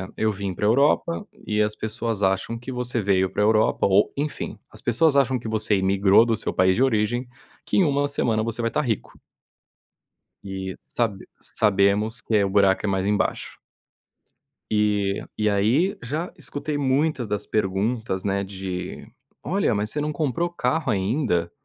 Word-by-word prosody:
eu 110 0 +1
vim 100 -1 -4
pra 105 - -2
Europa 150 - +2 0.2
e 105 0 0
as 105 0 0
pessoas 110 -1 -3
acham 95 +4 0
que 120 +3 -8
você 125 -2 -1
veio 95 -1 +2
pra 105 +2 -1
Europa 110 0 +3
ou 100 +2 +3
enfim, 145 +1 -4
as - - -7
pessoas 140 +5 +2
acham 130 -1 +3
que 115 - -8
você 110 -1 +1
imigrou 95 +3 +4
do 115 -3 0
seu - - -2
país 95 0 +3
de 130 - +3
origem, 120 0 0 0.4
que - - -2
em 195 - +5
1 145 -2 +1
semana 115 -6 0
você 115 +1 -3
vai 115 - 0
estar 150 - 0
rico. 115 -7 -3 1.2
E 95 -1 -5
sab 110 -5 -2 0.2
sabemos 105 +2 +3
que 105 -3 +1
o 100 - 0
buraco 100 0 +3
é - - 0
mais 95 0 0
embaixo. 105 0 -1 1.1
E 105 -2 +1 0.2
e 105 0 +2
aí 115 - +2
já 150 +9 -4
escutei 145 +1 -4
muitas 135 -2 0
das 105 0 -3
perguntas, 105 0 -1
né, 100 0 0
de 95 -2 -6 0.4
"Olha, 180 - 0
mas 105 +1 -1
você 150 - -2
não 150 0 -2
comprou 160 +3 -1
carro 160 -2 -1
ainda? 95 - 0
110 Hz, 165 wpm, -24 LUFS, 100-130 Hz, 1.2 s, em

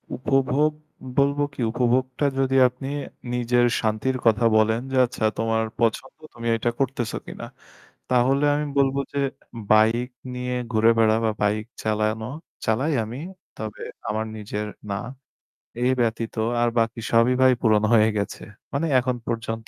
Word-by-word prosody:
উপভোগ 135 +3 +2 0.5
বলব 140 +1 +3
কি? 135 - -6
উপভোগটা 130 +3 +1
যদি 135 0 +1
আপনি 125 +2 -7 0.4
নিজের 120 0 +2 0.2
শান্তির 110 +4 0
কথা 115 0 +4
বলেন 110 +1 +2
যে, 135 - 0
আচ্ছা 120 -2 -3
তোমার 115 0 +1 0.2
পছন্দ 115 +3 -1 0.2
তুমি 115 0 -6
এটা 120 - 0
করতেছো 125 -4 -1
কিনা? - - -8 0.7
তাহলে 135 +4 +3
আমি 150 +1 -1
বলব 135 -1 +3 0.2
যে 140 - -1 0.5
bike 115 +4 +3 0.2
নিয়ে 125 0 -3 0.2
ঘুরে 110 +1 +5
বেড়ানো 110 0 +4
বা 110 - +2
bike 105 +2 0
চালানো, 110 +1 0 0.4
চালাই 130 +8 +1
আমি 120 +5 -7 0.4
তবে 110 -1 -6 0.3
আমার 110 +1 -1
নিজের 105 0 -4 0.2
না। 100 - -1 0.9
এই 125 - +3
ব্যতীত 115 -1 -1 0.3
আর 120 - +3
বাকি 115 0 -1
সবই 115 +2 +4
ভাই 130 0 +6
পূরণ 110 -3 +3
হয়ে 110 -1 +5
গেছে। 100 - -3 0.3
মানে 145 +4 0
এখন 125 0 -1
পর্যন্ত 115 -1 -3
120 Hz, 145 wpm, -24 LUFS, 110-130 Hz, 0.9 s, ভাই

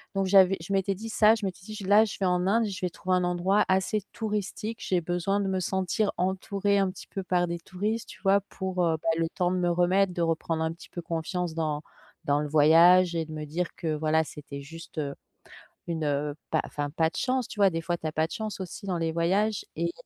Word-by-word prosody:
Donc 195 0 +1
j'avais 190 0 +6
je 175 - -7
m'étais 195 0 +1
dit 225 +4 -7
ça, 220 0 +5
je 215 -3 -4
m'étais 185 -1 -5
dit: 215 - -8
«Je 205 - -7
là, 205 +3 +6
je 210 - -5
vais 195 - +1
en 180 0 +1
Inde, 225 +3 +3
je 195 -2 -5
vais - - 0
trouver 185 +2 -1
un 180 - +1
endroit 180 +4 +2
assez 190 +2 +1
touristique. 215 +1 -3
J'ai 180 -2 0
besoin 175 +4 0
de 195 - -1
me 190 -1 0
sentir 190 +3 0
entourée, 195 +2 0
un 195 -1 +2
petit 185 - -12
peu 195 - -5
par 180 -1 +1
des 170 0 -3
touristes», 210 +6 -3
tu 185 - -12
vois? 195 0 +4
Pour, 185 -2 -1
heu, 165 -1 +2
bah, - - +1
le 165 0 +1
temps 180 +1 0
de 185 - 0
me 175 -1 +1
remettre, 180 +2 +2
de 175 - -2
reprendre 165 -1 0
un 160 - 0
petit 170 - -14
peu 175 - -6
confiance 170 +1 -3
dans 155 -2 -1 0.4
dans 145 0 +2
le 150 - -2
voyage 170 +4 +6
et 165 -1 0
de 155 - -9
me 155 0 -5
dire: 165 +4 -3
«Que, 165 - -5
voilà, 155 +1 +2
c'était 145 -2 -9
juste, 165 +3 -11
heu, 140 -2 -2 0.8
une, 165 -2 -2
heu, 145 0 -1 0.2
pas 160 - +2
enfin 145 -1 -4
pas 160 +2 +1
de - - -11
chance», 255 -1 0
tu - - -10
vois? 195 -1 +6
Des 165 -1 -2
fois, 175 +1 -1
tu 160 - -6
as 155 - -2
pas 160 0 +1
de - - -10
chance 215 -2 -4
aussi 190 +2 -7
dans 180 -3 -1
les 165 -1 0
voyages 195 +5 +1
et 170 +1 0
180 Hz, 250 wpm, -27 LUFS, 165-195 Hz, 0.8 s, j'avais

